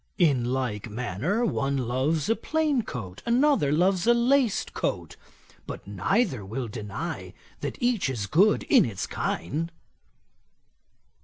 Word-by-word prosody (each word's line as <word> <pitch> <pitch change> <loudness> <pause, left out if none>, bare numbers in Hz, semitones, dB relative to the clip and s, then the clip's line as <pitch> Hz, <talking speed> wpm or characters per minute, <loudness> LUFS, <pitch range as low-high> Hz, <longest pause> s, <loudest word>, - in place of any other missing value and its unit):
In 140 -9 +3
like 120 -4 -2
manner, 125 - -1
one 140 -8 0
loves 130 +5 0
a 225 - +3
plain 305 -3 0
coat, 100 - -7
another 245 - +3
loves 180 +5 +2
a 240 - +6
laced 240 -3 +2
coat; - - -3 0.5
but - - -7
neither 105 - 0
will 115 +6 -4
deny 105 -2 -6 0.2
that - - -4
each 240 - +1
is 115 -6 -2
good 190 - +3
in 255 -7 +5
its 110 - -3
kind.' 155 - -3
145 Hz, 130 wpm, -26 LUFS, -, 0.5 s, a